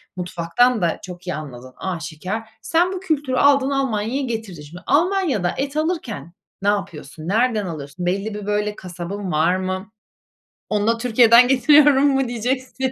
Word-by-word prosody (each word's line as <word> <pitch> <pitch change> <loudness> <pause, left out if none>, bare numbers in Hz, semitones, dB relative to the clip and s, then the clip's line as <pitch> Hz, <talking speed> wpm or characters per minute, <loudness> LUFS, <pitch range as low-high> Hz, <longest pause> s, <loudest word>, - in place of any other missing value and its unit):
mutfaktan 180 +7 +1
da 170 -2 0
çok 180 0 -10
iyi 180 - -2
anladığın 130 -4 -9
aşikâr. 180 +3 -4 0.2
Sen 335 +10 +1
bu 375 - -4
kültürü 295 -8 -1
aldın 275 0 +4
Almanya'ya 265 -2 -1
getirdin 220 - -5
şimdi. 160 +5 -12
Almanya'da 315 - +2
et 280 +2 -3
alırken 275 - -3 0.3
ne 200 - -2
yapıyorsun? 165 -6 -4
Nereden 220 +1 +1
alıyorsun? 160 0 -6
Belli 195 +4 -1
bir 210 -1 -6
böyle 210 0 -1
kasabın 185 +2 -6
var 160 +4 +2
mı? 185 +2 -4 0.8
Onu 210 0 0
da 230 0 +2
Türkiye'den 235 0 +6
getiriyorum 280 +2 +5
mu 270 -2 +1
diyeceksin? 255 +2 -2
215 Hz, 150 wpm, -21 LUFS, 180-265 Hz, 0.8 s, Türkiye'den